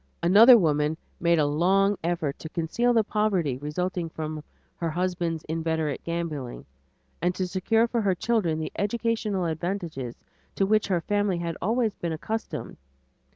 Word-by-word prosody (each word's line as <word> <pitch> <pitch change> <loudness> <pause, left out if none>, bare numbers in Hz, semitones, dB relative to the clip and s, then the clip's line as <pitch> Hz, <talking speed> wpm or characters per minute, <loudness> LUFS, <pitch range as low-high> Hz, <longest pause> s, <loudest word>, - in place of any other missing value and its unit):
Another 220 +8 +8
woman 150 -4 +1 0.2
made 170 0 +3
a 150 - +3
long 190 +7 +3
effort 165 -4 -1
to 160 - -7
conceal 175 +10 0
the 230 -2 +4
poverty 195 - 0
resulting 170 +4 -3
from 155 -1 -5 0.3
her 170 - -2
husband's 170 -1 -2
inveterate 160 -2 -2
gambling 155 - -4 0.6
and 180 +2 +1
to 185 - -1
secure 225 +6 +2
for 235 0 -1
her 195 -3 +1
children 190 -6 0
the 155 - -4
educational 215 -3 -1
advantages 160 -6 -3 0.4
to 195 - +2
which 215 +2 +2
her 180 -4 +1
family 205 -1 0
had 170 -1 -3
always 225 +2 +1
been 170 -2 -4
accustomed. 220 +8 -5
175 Hz, 150 wpm, -26 LUFS, 160-205 Hz, 0.6 s, Another